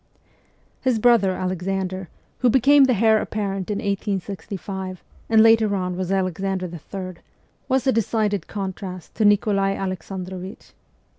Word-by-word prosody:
His 255 -3 +2
brother, 220 -4 +4
Alexander, 185 0 -3 0.3
who 250 - +4
became 270 +3 +6
the 255 -2 +2
heir 220 +1 +4
apparent 195 -3 -3
in 205 - -1
1865, 195 -1 -4 0.3
and 220 -1 +6
later 225 -2 +5
on 180 -1 -2
was 185 0 -3
Alexander 190 0 -1
III., 180 +1 -7 0.5
was 260 -1 +2
a 265 - +4
decided 215 -4 0
contrast 190 -3 -6
to 220 - +1
Nikolai 200 -1 +3
Alexandrovich. 185 0 -6
195 Hz, 125 wpm, -23 LUFS, 185-220 Hz, 0.5 s, became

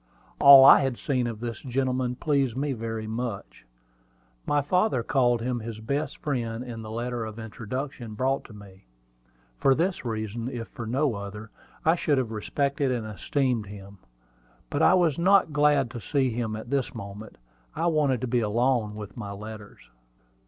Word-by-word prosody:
All 140 -1 +10
I - - +9
had 135 -3 -1
seen 125 -4 -1
of 115 -2 -6
this 120 -2 -5
gentleman 130 -1 -1
pleased 135 -4 0
me 140 0 -1
very 115 -2 -4
much. 110 - -5 0.8
My 145 -1 +2
father 180 - +1
called 120 -3 +2
him 125 0 -1
his 110 -1 -7
best 140 +6 -3
friend 120 -5 -3
in 120 -3 -7
the 110 - -8
letter 120 +1 -3
of 110 0 -7
introduction 115 +1 -6
brought 135 +4 0
to - - -13
me. 100 -2 -14 0.7
For 135 - +4
this 180 +5 -1
reason, 115 0 -4
if 120 -3 -6
for 115 - -7
no 135 +3 +1
other, 105 +1 -7 0.3
I 160 - +5
should 155 -4 +1
have 125 -4 -1
respected 140 +5 -1
and 120 -3 -2
esteemed 115 +1 -1
him; 100 -1 -11 0.7
but - - 0
I - - +6
was 170 -5 +2
not 185 -3 +4
glad 145 -4 +3
to 120 -2 -7
see 135 -2 0
him 110 -2 -2
at 110 +3 -8
this 135 -3 -1
moment. 105 0 -9 0.4
I 165 - -1
wanted 150 -7 +2
to 130 - -2
be 120 0 +1
alone 115 0 +1
with 105 -1 -8
my 105 -4 -6
letters. 105 +1 -9
120 Hz, 175 wpm, -26 LUFS, 110-135 Hz, 0.8 s, All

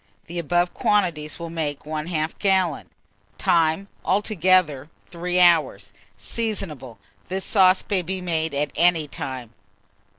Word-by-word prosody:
The 170 +1 -5
above 175 +2 +1
quantities 170 -7 0
will 170 -1 -7
make 150 -4 -3
1/2 155 +1 -3
gallon. 190 -6 +1 0.5
Time. 165 +3 +2 0.2
Altogether, 185 - +2 0.2
3 180 +1 -2
hours. 150 - +3 0.2
Seasonable. 155 - -4 0.3
This 190 +1 -3
sauce 185 -2 +4
may 195 -3 +1
be 185 +2 -4
made 160 -4 -2
at 145 +1 -1
any 170 -3 +3
time. 130 -5 -6
170 Hz, 120 wpm, -23 LUFS, 150-185 Hz, 0.5 s, sauce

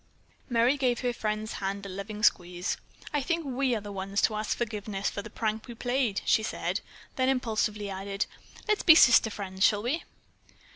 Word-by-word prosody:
Merry 240 +3 +3
gave 250 -3 +1
her 245 -1 0
friend's 215 -1 -3
hand 200 +1 -3
a - - -6
loving 205 +3 -6
squeeze. 180 0 +1 0.4
"I 290 - +1
think 335 +3 -1
we 260 -1 0
are 215 - -3
the 205 0 -8
ones 195 +1 -2
to - - +3
ask 215 0 -2
forgiveness 210 -3 -2
for 200 - -4
the 215 - -9
prank 220 +1 -2
we 240 - -8
played," 245 -3 0
she 220 - +4
said; 220 - -2 0.4
then 260 0 +2
impulsively 220 -5 0
added: 195 +1 -2 0.4
"Let's 425 -1 +2
be 325 - +8
sister 235 -6 +7
friends, 190 -2 -4
shall 205 +1 +4
we?" 275 +8 -1
215 Hz, 185 wpm, -28 LUFS, 200-245 Hz, 0.4 s, be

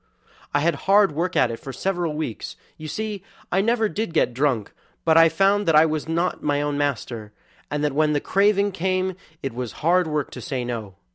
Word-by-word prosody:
"I 145 - +1
had 170 +2 +2 0.2
hard 200 -1 +6
work 170 +5 -2
at 120 - +3
it 115 - -6
for 135 - -7
several 175 +3 -2
weeks; 150 -9 -5 0.2
you 155 - -8
see 210 +4 -4 0.3
I 190 - +3
never 225 +1 +2
did 210 -5 -4
get 125 - +2
drunk, 125 -5 0 0.3
but 160 -1 +4
I 165 0 +7
found 195 +4 +2
that 165 - +4
I 155 +1 +7
was 155 0 -2
not 170 +2 0
my 145 -1 0
own 145 0 -1
master, 120 -6 -3 0.4
and 150 0 -2
that 150 -2 +1
when 155 +1 +2
the 145 - +2
craving 200 +4 +2
came 185 0 0
on 185 - -7 0.3
it 135 -3 -3
was 125 -2 -5
hard 180 +1 +4
work 150 -2 -2
to 125 - -8
say 125 +1 -3
'no'. 110 -6 -5
155 Hz, 215 wpm, -23 LUFS, 140-185 Hz, 0.4 s, I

